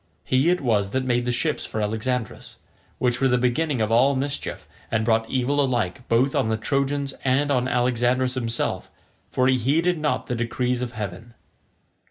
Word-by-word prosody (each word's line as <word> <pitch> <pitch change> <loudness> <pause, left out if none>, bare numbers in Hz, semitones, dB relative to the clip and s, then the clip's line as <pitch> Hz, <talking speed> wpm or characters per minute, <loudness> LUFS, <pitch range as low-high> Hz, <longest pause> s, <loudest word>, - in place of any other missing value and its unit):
He 130 +6 +2
it 180 0 +1
was 105 -6 +1
that 130 - -1
made 120 -1 +1
the 120 - 0
ships 150 +6 0
for 110 - -4
Alexandrus, 110 +3 -3 0.4
which 120 0 0
were 135 - +4
the 125 -1 +3
beginning 125 +2 0
of 110 0 0
all 130 +5 +4
mischief, 140 +2 -3 0.2
and 110 -1 0
brought 110 -1 +1
evil 135 +2 +1
alike 120 -4 -1
both 125 +4 +2
on - - +1
the 110 0 0
Trojans 140 +3 -1
and 140 +2 +2
on 125 -2 +1
Alexandrus 125 +1 +1
himself; 120 -2 -2 0.4
for 130 - +1
he 130 -1 +3
heeded 165 +8 +1
not 150 -4 -1
the - - -3
decrees 125 +1 -1
of 125 -1 -4
heaven. 110 +2 -7
125 Hz, 180 wpm, -24 LUFS, 115-135 Hz, 0.4 s, were